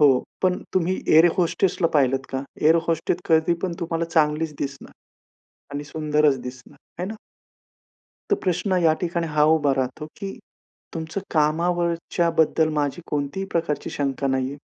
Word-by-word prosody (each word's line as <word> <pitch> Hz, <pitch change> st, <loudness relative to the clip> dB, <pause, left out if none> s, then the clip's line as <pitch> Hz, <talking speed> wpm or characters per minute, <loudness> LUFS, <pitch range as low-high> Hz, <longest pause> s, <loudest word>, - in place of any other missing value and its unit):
हो. 135 Hz, -4 st, +5 dB, 0.2 s
पण 185 Hz, -1 st, +1 dB
तुम्ही 185 Hz, +1 st, +1 dB
एअर 160 Hz, +2 st, +7 dB
होस्टेसला 180 Hz, 0 st, +1 dB
पाहिलंत 135 Hz, -2 st, +3 dB
का? 135 Hz, 0 st, -2 dB, 0.2 s
एअर 160 Hz, +2 st, +5 dB
होस्टेस 165 Hz, +1 st, 0 dB
कधी 160 Hz, +1 st, +4 dB
पण 180 Hz, -2 st, -1 dB
तुम्हाला 165 Hz, 0 st, -1 dB
चांगलीच 155 Hz, -1 st, +1 dB
दिसणार 140 Hz, 0 st, -5 dB, 0.8 s
आणि 145 Hz, +1 st, -3 dB
सुंदरच 150 Hz, -2 st, +1 dB
दिसणार 125 Hz, +2 st, -10 dB, 0.2 s
आहे 180 Hz, -, -1 dB
ना. 220 Hz, -, -5 dB, 1.2 s
तर -, -, +6 dB
प्रश्न 185 Hz, +1 st, 0 dB
या 160 Hz, -1 st, +5 dB
ठिकाणी 170 Hz, -1 st, -1 dB
हा 150 Hz, -1 st, +2 dB
उभा 145 Hz, -3 st, +2 dB
राहतो 135 Hz, +3 st, -2 dB
की 195 Hz, -1 st, -5 dB, 0.6 s
तुमचं 160 Hz, +3 st, -4 dB
कामावरच्याबद्दल 165 Hz, 0 st, +1 dB
माझी 145 Hz, +2 st, -1 dB
कोणतीही 145 Hz, +7 st, -2 dB
प्रकारची 165 Hz, -3 st, -1 dB
शंका 140 Hz, -1 st, -1 dB
नाहीये 130 Hz, +1 st, -1 dB
160 Hz, 140 wpm, -23 LUFS, 145-170 Hz, 1.2 s, एअर